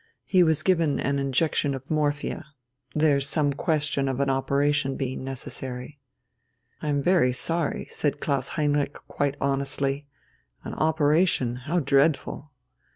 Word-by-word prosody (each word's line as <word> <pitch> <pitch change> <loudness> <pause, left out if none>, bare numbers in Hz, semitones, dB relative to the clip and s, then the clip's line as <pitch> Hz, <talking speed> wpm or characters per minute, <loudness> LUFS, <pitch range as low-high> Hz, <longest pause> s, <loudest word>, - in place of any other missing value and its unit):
He 185 -2 +4
was 160 -3 +3
given 165 -6 +2
an 140 0 0
injection 140 +1 +1
of 135 +4 -9
morphia. 150 -1 -1 0.5
There's 145 -2 +2
some 145 -3 +1
question 150 -2 0
of 130 0 -2
an 140 -1 +2
operation 140 +1 +1
being 130 -1 -3
necessary." 130 +1 -6 0.8
"I - - -4
am 145 -1 +1
very 175 -8 +4
sorry," 165 +5 -2
said 145 - -1
Klaus 140 -2 -1
Heinrich 145 -2 +1
quite 145 0 -1
honestly. 140 +1 -1 0.6
"An - - -6
operation? 155 -4 +2
How 170 +4 0
dreadful!" 140 +1 +1
145 Hz, 130 wpm, -26 LUFS, 135-155 Hz, 0.8 s, He